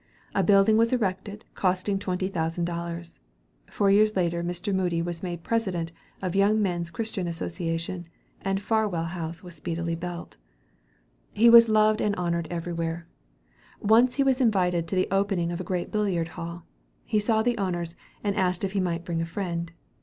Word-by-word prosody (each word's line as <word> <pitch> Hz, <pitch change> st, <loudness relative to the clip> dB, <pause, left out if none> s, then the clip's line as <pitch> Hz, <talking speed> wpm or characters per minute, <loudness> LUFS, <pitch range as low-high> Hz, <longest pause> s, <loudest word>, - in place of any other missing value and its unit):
A 195 Hz, -, +2 dB
building 200 Hz, +3 st, +5 dB
was 230 Hz, +1 st, +3 dB
erected, 205 Hz, -3 st, -2 dB
costing 190 Hz, +1 st, 0 dB
twenty 185 Hz, -1 st, -2 dB
thousand 170 Hz, -2 st, -1 dB
dollars. 170 Hz, 0 st, -5 dB, 0.5 s
Four 200 Hz, -1 st, +2 dB
years 215 Hz, +1 st, +4 dB
later, 170 Hz, -2 st, 0 dB
Mr. 175 Hz, +4 st, -2 dB
Moody 180 Hz, -3 st, +1 dB
was 170 Hz, 0 st, -3 dB
made 175 Hz, -2 st, -5 dB
President 185 Hz, -8 st, -1 dB, 0.3 s
of 185 Hz, -, 0 dB
the 195 Hz, -, +1 dB
Young 210 Hz, +2 st, +4 dB
Men's 175 Hz, -4 st, -1 dB
Christian 195 Hz, 0 st, -3 dB
Association, 170 Hz, +1 st, -3 dB, 0.3 s
and 195 Hz, +1 st, -1 dB
Farwell 210 Hz, -6 st, +1 dB
Hall 165 Hz, -1 st, -4 dB
was 180 Hz, -1 st, -10 dB
speedily 170 Hz, +1 st, -3 dB
built. 175 Hz, 0 st, -7 dB, 1.0 s
He 230 Hz, +2 st, +6 dB
was 230 Hz, -1 st, +9 dB
loved 215 Hz, 0 st, +4 dB
and 205 Hz, -1 st, +1 dB
honored 170 Hz, -2 st, -1 dB
everywhere. 170 Hz, -1 st, -3 dB, 0.7 s
Once 235 Hz, +4 st, +4 dB
he 280 Hz, -, +3 dB
was 265 Hz, -1 st, +2 dB
invited 180 Hz, -7 st, +2 dB
to 190 Hz, -, -2 dB
the 185 Hz, -, +2 dB
opening 195 Hz, -3 st, +1 dB
of 175 Hz, +1 st, -3 dB
a -, -, -4 dB
great 180 Hz, 0 st, -3 dB
billiard 190 Hz, -6 st, 0 dB
hall. 170 Hz, +1 st, -7 dB, 0.4 s
He 215 Hz, -, +1 dB
saw 220 Hz, +1 st, +2 dB
the 240 Hz, -1 st, 0 dB
owners, 175 Hz, -3 st, -2 dB, 0.3 s
and 200 Hz, -1 st, 0 dB
asked 185 Hz, -2 st, +1 dB
if 195 Hz, -, 0 dB
he 200 Hz, -, 0 dB
might 175 Hz, -2 st, -1 dB
bring 165 Hz, -1 st, -1 dB
a -, -, -1 dB
friend. 170 Hz, -2 st, -3 dB
180 Hz, 175 wpm, -26 LUFS, 170-205 Hz, 1.0 s, was